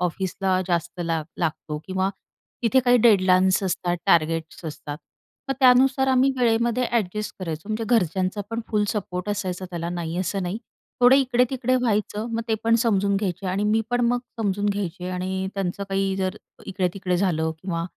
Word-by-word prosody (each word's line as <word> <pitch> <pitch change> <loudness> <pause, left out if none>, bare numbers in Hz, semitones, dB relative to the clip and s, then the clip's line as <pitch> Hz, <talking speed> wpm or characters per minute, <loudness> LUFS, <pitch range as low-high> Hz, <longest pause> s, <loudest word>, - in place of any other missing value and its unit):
ऑफिसला 185 +1 0
जास्त 175 0 -1
लाग 165 -2 -1
लागतो 155 -2 -2
किंवा 190 0 0 0.5
तिथे 240 +3 +4
काही 245 0 +4
डेडलाईन्स 190 -4 +4
असतात, 180 -2 -1
टार्गेट्स 165 -1 +1
असतात. 150 -1 -6 0.5
मग 270 - 0
त्यानुसार 265 +1 +5
आम्ही 260 +1 +4
वेळेमध्ये 235 +1 +2
ॲडजस्ट 210 -2 -1
करायचो. 165 0 -5
म्हणजे 220 +1 -2
घरच्यांचा 185 +1 0
पण 230 +1 -2
फुल 210 -2 +1
सपोर्ट 180 -2 -3
असायचा 190 -3 -3
त्याला, 170 -1 -4
नाही 170 -1 -4
असं 190 +1 -1
नाही. 180 +5 -3 0.4
थोडं 250 +2 +7
इकडे-तिकडे 255 -1 +1
व्हायचं. 215 -3 0
मग 230 - -1
ते 220 - +2
पण 230 0 +4
समजून 200 -3 +2
घ्यायचे 195 -2 -2
आणि 190 +3 0
मी 215 +1 +3
पण 245 0 +1
मग 245 +1 +2 0.2
समजून 205 -1 0
घ्यायचे 185 -3 -2
आणि 185 +1 -2
त्यांचं 195 0 -2
काही 195 0 0
जर 190 +1 -2 0.3
इकडे-तिकडे 185 -1 -1
झालं 160 -4 +1
किंवा 170 -3 -2
195 Hz, 160 wpm, -24 LUFS, 180-225 Hz, 0.5 s, थोडं